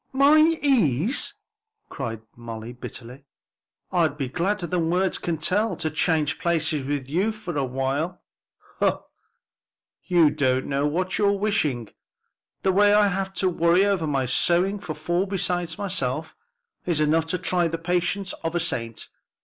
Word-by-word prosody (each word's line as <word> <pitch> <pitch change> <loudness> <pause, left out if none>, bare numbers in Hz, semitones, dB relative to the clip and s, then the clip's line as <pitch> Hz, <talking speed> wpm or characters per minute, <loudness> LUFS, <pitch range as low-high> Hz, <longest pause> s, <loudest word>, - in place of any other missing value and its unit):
"My 280 +3 +6 0.2
ease!" 220 - +2 0.5
cried 115 -1 -5
Molly 115 0 -8
bitterly, 125 +2 -9 0.7
"I'd 165 -5 +1
be 135 -4 -3
gladder 180 +5 -1
than 170 -1 -1
words 185 +2 +1
can 170 -2 -2
tell 205 +8 0
to 155 - -3
change 155 -1 +1
places 155 -4 0
with 140 -1 -3
you 185 +10 +1
for 210 -6 -6
awhile." 135 +5 -1 0.6
"Humph! - - +1 1.0
you 170 -5 +4
don't 130 -1 +1
know 140 +1 0
what 185 +5 -1
you're 200 -1 +3
wishing; 150 - 0 0.7
the 190 - +3
way 205 +2 +5
I 210 -1 +5
have 190 0 -2
to 185 +1 +1
worry 175 +2 +3
over 195 -6 +1
my 135 -3 0
sewing 175 +10 +2
for 160 -5 -6
four 175 +6 -1
besides 180 -3 -2
myself, 160 -7 -2 0.5
is 170 -4 0
enough 155 +1 +2
to 180 - -1
try 175 -1 +1
the 165 0 -3
patience 180 +3 -1
of 165 +1 -2
a - - +2
saint. 115 -9 -3
170 Hz, 150 wpm, -24 LUFS, 145-190 Hz, 1.0 s, My